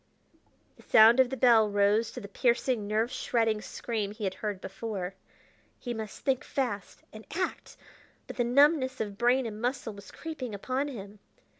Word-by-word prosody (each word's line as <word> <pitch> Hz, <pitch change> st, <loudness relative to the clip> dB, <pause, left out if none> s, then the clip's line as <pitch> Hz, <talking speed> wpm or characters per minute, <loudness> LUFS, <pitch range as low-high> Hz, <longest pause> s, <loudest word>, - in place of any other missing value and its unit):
The -, -, -17 dB
sound 225 Hz, +3 st, +6 dB
of 260 Hz, -2 st, +5 dB
the 265 Hz, -, -4 dB
bell 225 Hz, -3 st, +5 dB
rose 205 Hz, +2 st, +2 dB
to -, -, -6 dB
the 205 Hz, -, -8 dB
piercing, 235 Hz, +1 st, 0 dB
nerve 220 Hz, +3 st, 0 dB
shredding 225 Hz, -4 st, 0 dB
scream 220 Hz, -2 st, -3 dB
he 215 Hz, +1 st, -8 dB
had 190 Hz, -2 st, -1 dB
heard 205 Hz, -2 st, -4 dB
before. 195 Hz, -2 st, -5 dB, 0.6 s
He 245 Hz, -, -5 dB
must 220 Hz, -3 st, -7 dB
think 265 Hz, -2 st, 0 dB
fast 240 Hz, -7 st, -4 dB
and 215 Hz, 0 st, -10 dB
act! 370 Hz, +1 st, -3 dB, 0.5 s
but -, -, -9 dB
the 245 Hz, -, +2 dB
numbness 260 Hz, +2 st, +3 dB
of 205 Hz, -2 st, -3 dB
brain 245 Hz, +2 st, +3 dB
and 215 Hz, -1 st, -6 dB
muscle 245 Hz, -2 st, -2 dB
was 200 Hz, -1 st, -12 dB
creeping 270 Hz, -9 st, -6 dB
upon 260 Hz, +7 st, -2 dB
him. 205 Hz, -6 st, -9 dB
225 Hz, 170 wpm, -29 LUFS, 210-255 Hz, 0.6 s, sound